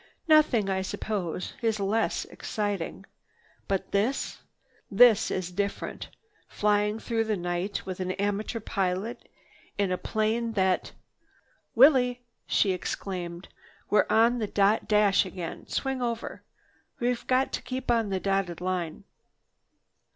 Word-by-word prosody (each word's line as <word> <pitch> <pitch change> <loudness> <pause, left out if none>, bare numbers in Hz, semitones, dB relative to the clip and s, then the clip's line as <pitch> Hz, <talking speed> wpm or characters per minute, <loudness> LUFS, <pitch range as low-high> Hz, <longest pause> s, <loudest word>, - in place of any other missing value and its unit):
Nothing, 300 -10 +5
I 190 -1 0
suppose, 190 -2 -3
is 225 -2 0
less 210 +3 0
exciting. 205 -4 -4 0.6
But 195 -1 -2
this—this 220 0 +2
is 180 -1 -3
different, 200 +2 -3 0.4
flying 210 0 +1
through 225 0 -1
the 215 -2 0
night 175 +3 -3
with 185 -1 -5
an 185 0 -1
amateur 205 +3 -2
pilot 195 +1 -2 0.5
in 200 -2 +1
a 180 - -1
plane 225 +2 -1
that—" 190 -3 +1 0.8
"Willie!" 250 -1 +6 0.3
she 200 - +3
exclaimed, 180 -1 -4 0.4
"We're 210 - +4
on 235 +2 +4
the 215 - -1
dot 200 +2 +2
dash 210 -2 +4
again. 180 -3 -7
Swing 265 -1 -2
over. 235 -1 -3 0.6
We've 245 -1 -1
got 260 +1 +2
to - - -2
keep 255 0 -3
on 230 -3 +2
the 190 -1 -1
dotted 195 -3 -1
line." 180 -3 -3
205 Hz, 120 wpm, -27 LUFS, 190-230 Hz, 0.8 s, Willie